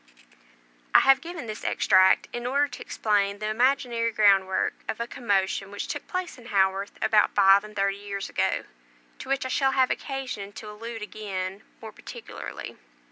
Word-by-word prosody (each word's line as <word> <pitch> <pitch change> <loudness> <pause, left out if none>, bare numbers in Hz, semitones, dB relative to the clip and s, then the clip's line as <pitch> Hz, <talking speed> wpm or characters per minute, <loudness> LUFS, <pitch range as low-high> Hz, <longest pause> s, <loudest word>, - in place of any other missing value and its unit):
I - - +9
have 270 +1 +5
given 335 -3 -7
this 215 -1 -7
extract, 190 -2 +4
in 240 0 -3
order 285 +3 +2
to 250 - -10
explain 200 -2 0
the 215 +1 -3
imaginary 240 -1 +1
groundwork 195 -3 +3 0.2
of 220 - -3
a 235 - -1
commotion 200 -5 -1
which 205 0 -5
took - - -5
place 365 -7 -4
in 240 - -13
Haworth 195 -1 +1
about 210 -1 +3
five 195 0 +6
and 215 0 -11
thirty 195 0 0
years 200 -1 -5
ago, - - 0 0.6
to - - -9
which 275 -1 0
I - - -3
shall 270 0 +2
have 260 -1 +3
occasion 255 -8 -4
to 210 0 -9
allude 225 +1 -7
again 195 -2 -5 0.2
more 220 - -7
particularly. - - -9
215 Hz, 170 wpm, -26 LUFS, 200-255 Hz, 0.6 s, I